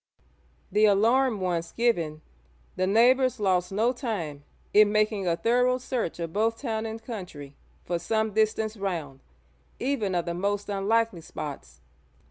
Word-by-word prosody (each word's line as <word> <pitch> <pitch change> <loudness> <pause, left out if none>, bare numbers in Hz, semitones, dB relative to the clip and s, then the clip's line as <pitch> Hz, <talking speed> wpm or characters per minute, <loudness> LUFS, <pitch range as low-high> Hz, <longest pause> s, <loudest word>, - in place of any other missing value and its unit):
The 210 +1 +4
alarm 225 +2 +3
once 170 -2 -1
given, 170 -10 0 0.5
the 185 - 0
neighbours 250 +5 +4
lost 185 -3 +1
no 225 +5 +1
time 185 - -4 0.3
in 210 0 +6
making 215 -2 +1
a 170 - +2
thorough 250 +5 +2
search 250 -7 -3
of 165 -1 -4
both 225 +2 +1
town 225 -4 -2
and 220 0 -6
country 180 - -8 0.3
for 175 -1 -1
some 220 +2 -1
distance 220 0 +1
round, 170 -9 -4 0.6
even 235 -8 -1
of 175 - 0
the 170 - -2
most 200 +3 -2
unlikely 205 -1 +1
spots. 135 - -8
210 Hz, 140 wpm, -27 LUFS, 175-230 Hz, 0.6 s, in